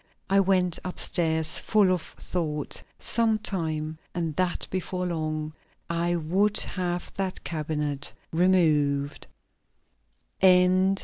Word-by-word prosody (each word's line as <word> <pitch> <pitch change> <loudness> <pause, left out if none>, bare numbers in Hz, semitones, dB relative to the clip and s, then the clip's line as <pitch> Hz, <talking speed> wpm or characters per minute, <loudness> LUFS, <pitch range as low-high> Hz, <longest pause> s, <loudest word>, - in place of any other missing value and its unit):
I 195 - +5
went 185 -3 +2
upstairs 160 -3 +1
full 205 -4 +3
of 180 -2 +1
thought. 155 -5 -4 0.2
Sometime, 170 -9 0 0.2
and 165 -3 -2
that 185 +1 -1
before 185 0 -2
long, 155 -2 -3 0.4
I 170 +1 0
would 185 +6 +1
have 175 -1 -2
that 190 -1 -3
cabinet 150 -3 -3 0.2
removed. 155 -6 +2
170 Hz, 90 wpm, -26 LUFS, 155-185 Hz, 0.4 s, I